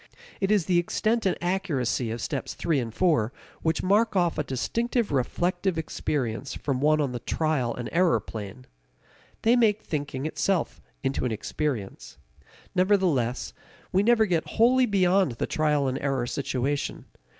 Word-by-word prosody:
It 195 - 0
is 205 -5 +3
the 180 -2 +3
extent 215 +5 0
and 185 - 0
accuracy 150 - 0
of 115 +1 -4
steps - - -3
three 160 -4 0
and 115 -3 -3
four 125 -6 +2 0.3
which 160 0 0
mark 210 +4 +3
off 175 -4 +2
a - - +1
distinctive 230 - -1
reflective 175 +7 0
experience 135 -5 -2
from 135 -3 -2
one 155 +1 +4
on 140 -4 0
the 120 - -4
trial 140 -3 -1
and 120 - -5
error 170 -8 +3
plane. 105 +3 -8 0.8
They 230 +2 +5
make 215 -3 +3
thinking 145 -3 -3
itself 175 +2 -1 0.2
into 135 - -1
an 125 - 0
experience. 110 - -4 0.6
Nevertheless, 180 - +1 0.4
we 190 - +3
never 220 +1 +4
get 170 -5 0
wholly 250 +3 +5
beyond 190 - +3
the 115 - -2
trial 150 -3 +1
and 130 +1 -1
error 135 -3 -1
situation. 140 +2 -2
155 Hz, 150 wpm, -26 LUFS, 130-190 Hz, 0.8 s, They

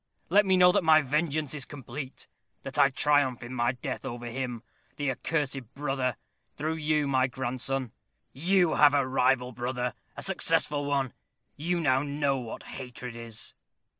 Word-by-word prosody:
Let 200 +3 +5
me 190 -1 +4
know 180 0 +7
that 180 - +2
my 155 -1 +6
vengeance 150 +1 0
is 145 -3 -4
complete, 135 0 -8 0.4
that - - -4
I 140 - +7
triumph 135 -3 +2
in 120 +2 -7
my 120 0 +1
death 125 - -5
over 120 -2 -6
him, 120 -1 -4 0.3
the 145 -2 -1
accursed 135 -3 -3
brother, 135 -4 -1 0.4
through 160 +2 -2
you, 150 -1 +1
my 130 -1 +3
grandson. 130 0 -3 0.4
You 175 +3 +3
have 145 -1 +7
a 140 -2 +2
rival 130 -1 +2
brother 125 +1 -2 0.2
a - - -4
successful 145 -1 +2
one; 140 -3 0 0.4
you 170 +4 -1
know 135 -5 +3
now 145 -1 0
what 120 -3 -6
hatred 125 -2 -7
is." 115 -2 -6
135 Hz, 160 wpm, -28 LUFS, 125-150 Hz, 0.4 s, know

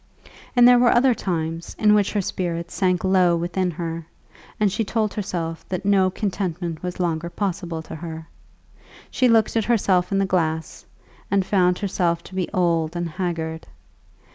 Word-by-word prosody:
And 245 -1 +7
there 245 0 +7
were 240 -1 +5
other 250 +1 +4
times, 165 -5 -3
in 210 -1 +4
which 205 -2 +2
her 205 - +1
spirits 170 -2 -3
sank 180 -2 +1
low 185 -2 +4
within 180 +2 -1
her, 165 -1 -5 0.5
and 210 -2 +3
she 225 - -1
told 215 0 -1
herself 170 -5 -4
that 185 +1 -3
no 195 -2 +4
contentment 180 -4 -3
was 180 -1 -4
any 180 - -2
longer 170 0 -2
possible 175 -3 -3
to - - -10
her. 160 0 -7 0.8
She 255 - +3
looked 225 -1 +3
at 225 -2 +1
herself 195 -6 +2
in 195 - +1
the 195 - +2
glass, 160 -4 -2 0.4
and 195 -1 +2
found 180 -2 +2
herself 175 -4 -1
to - - -13
be 185 -2 -2
old 170 -2 +1
and 175 0 -2
haggard. 165 -2 -4
180 Hz, 170 wpm, -23 LUFS, 170-200 Hz, 0.8 s, And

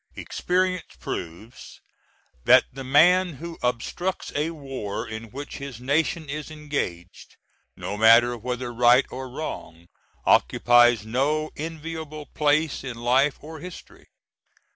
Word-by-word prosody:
Experience 185 0 -1
proves 105 +9 -7 0.7
that - - +7
the 135 +1 -7
man 175 +7 +4
who 165 +4 -8
obstructs 125 +10 -2
a 150 +3 0
war 135 -10 -5
in 110 +1 -6
which 140 +5 -7
his 140 -4 -7
nation 155 +5 0
is 150 +2 -5
engaged, 145 - -5 0.4
no 100 - -4
matter 115 +3 +6
whether 125 +1 -4
right 120 +2 +5
or 130 0 -6
wrong, 85 - -7 0.4
occupies 120 -3 +4
no 145 +7 0
enviable 160 -1 -6
place 150 0 0
in 125 -3 -6
life 130 +4 +2
or 160 +1 -9
history. 180 +2 -11
140 Hz, 120 wpm, -25 LUFS, 120-155 Hz, 0.7 s, that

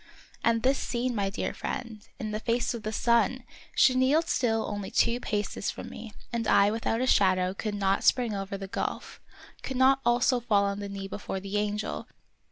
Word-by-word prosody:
And 230 -1 +2
this 265 +1 +3
scene, 245 +1 -1
my 200 -3 0
dear 200 - -3
friend, 225 -3 -5 0.2
in 220 -4 -4
the 215 - -2
face 235 +2 0
of 235 - -5
the 215 -1 -3
sun! 235 +2 +2 0.3
She 260 - +6
kneeled 265 +6 +3
still 225 -3 +1
only 205 -2 -4
two 235 +1 +2
paces 210 -3 -2
from - - -6
me, 225 -1 -9 0.2
and 230 -2 -1
I 200 +1 +5
without 225 +1 -1
a - - +2
shadow 185 -5 +3
could 210 +1 -4
not 195 -1 +1
spring 245 -4 +3
over 195 0 -4
the 195 0 -6
gulf, - - -4 0.4
could 265 - -4
not 265 +1 +5
also 240 +1 +3
fall 210 -4 +2
on 200 0 -1
the 200 -1 -5
knee 195 -1 -5
before 195 -1 -5
the 195 +1 -6
angel 210 0 -2
220 Hz, 195 wpm, -28 LUFS, 200-240 Hz, 0.4 s, She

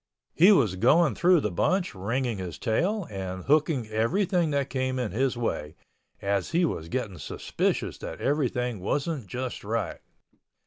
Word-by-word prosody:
He 180 +6 +7
was 115 - +3
going 135 - +4
through 175 - +4
the 105 - -1
bunch 180 - +1
ringing 115 +3 -2
his 90 -5 -5
tail 180 - 0
and 95 -2 -5
hooking 145 -4 +2
everything 170 - +1
that 140 -2 -1
came 130 -1 -1
in 125 -6 -2
his 125 +4 0
way, 80 -10 -3 0.5
as 100 -2 0
he 170 +1 +2
was 80 - -3
getting 105 -8 -3
suspicious - - -2
that - - -7
everything 125 -5 0
wasn't 140 - -2
just 125 +2 -5
right. 105 -4 -2
125 Hz, 150 wpm, -27 LUFS, 100-155 Hz, 0.5 s, He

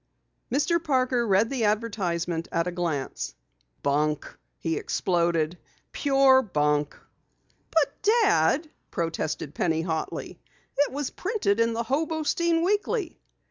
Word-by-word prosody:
Mr. 330 +6 +1
Parker 255 -5 +1
read 205 +4 +3
the 250 -5 0
advertisement 180 -6 -1
at 170 0 +1
a 180 - -2
glance. 170 -6 -3 0.5
"Bunk!" 150 +1 0 0.2
he 165 -1 -2
exploded. 170 -2 0 0.3
"Pure 270 -2 +5
bunk!" 150 - 0 0.7
"But 290 -4 +1
Dad," 340 - +3 0.2
protested 165 -4 -3
Penny 160 0 0
hotly. 160 -2 -4 0.4
"It 290 +1 +2
was 285 0 -3
printed 380 - 0
in 230 0 +3
the 230 +1 -1
Hobostein 320 +5 0
Weekly." 410 -1 -1
225 Hz, 110 wpm, -26 LUFS, -, 0.7 s, Pure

